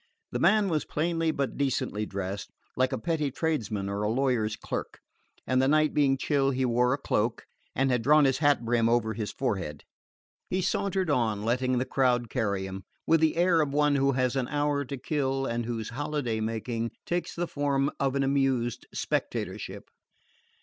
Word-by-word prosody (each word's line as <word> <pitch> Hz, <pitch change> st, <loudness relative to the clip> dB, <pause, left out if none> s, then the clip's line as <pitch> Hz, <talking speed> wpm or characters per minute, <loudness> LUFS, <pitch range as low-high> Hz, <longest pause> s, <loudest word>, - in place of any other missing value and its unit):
The -, -, -2 dB
man 215 Hz, -2 st, +4 dB
was 160 Hz, -4 st, 0 dB
plainly 165 Hz, +1 st, 0 dB
but 140 Hz, -4 st, -2 dB
decently 115 Hz, -6 st, -1 dB
dressed, 100 Hz, +1 st, -4 dB, 0.3 s
like 130 Hz, +1 st, +2 dB
a -, -, -1 dB
petty 160 Hz, -4 st, -1 dB
tradesman 120 Hz, -10 st, -2 dB
or 100 Hz, +1 st, -2 dB
a 105 Hz, -, 0 dB
lawyer's 120 Hz, -3 st, +1 dB
clerk, -, -, -5 dB, 0.5 s
and 130 Hz, 0 st, +2 dB
the 130 Hz, -, +3 dB
night 155 Hz, +1 st, +3 dB
being 140 Hz, -2 st, +3 dB
chill 135 Hz, 0 st, +1 dB
he 130 Hz, -1 st, 0 dB
wore 125 Hz, +1 st, +2 dB
a 140 Hz, -, +1 dB
cloak, 115 Hz, -4 st, -1 dB, 0.3 s
and 135 Hz, +1 st, +2 dB
had 125 Hz, -2 st, +2 dB
drawn 150 Hz, +4 st, +5 dB
his 135 Hz, -1 st, +2 dB
hat 145 Hz, -5 st, +3 dB
brim 115 Hz, -1 st, +2 dB
over 115 Hz, -2 st, +2 dB
his 110 Hz, -2 st, -4 dB
forehead. 95 Hz, -, -3 dB, 0.7 s
He 185 Hz, -, 0 dB
sauntered 190 Hz, -1 st, 0 dB
on, 110 Hz, -6 st, +1 dB
letting 125 Hz, +2 st, +1 dB
the 125 Hz, -, 0 dB
crowd 125 Hz, -4 st, +1 dB
carry 100 Hz, -6 st, -1 dB
him, 95 Hz, 0 st, -7 dB, 0.2 s
with 165 Hz, 0 st, +4 dB
the 160 Hz, 0 st, +2 dB
air 170 Hz, -1 st, +4 dB
of 145 Hz, -2 st, -1 dB
one 150 Hz, 0 st, +3 dB
who 140 Hz, 0 st, +2 dB
has 130 Hz, 0 st, +1 dB
an 130 Hz, -2 st, 0 dB
hour 145 Hz, -1 st, 0 dB
to 140 Hz, +2 st, -5 dB
kill, 135 Hz, 0 st, -1 dB
and 120 Hz, -2 st, -2 dB
whose 115 Hz, -3 st, -3 dB
holiday 140 Hz, -3 st, -2 dB
making 115 Hz, +1 st, -2 dB, 0.2 s
takes 175 Hz, 0 st, -2 dB
the 175 Hz, -, -1 dB
form 140 Hz, -2 st, 0 dB
of 135 Hz, -1 st, +1 dB
an 140 Hz, -, +2 dB
amused 135 Hz, -3 st, 0 dB
spectatorship. -, -, -3 dB
130 Hz, 185 wpm, -28 LUFS, 115-145 Hz, 0.7 s, drawn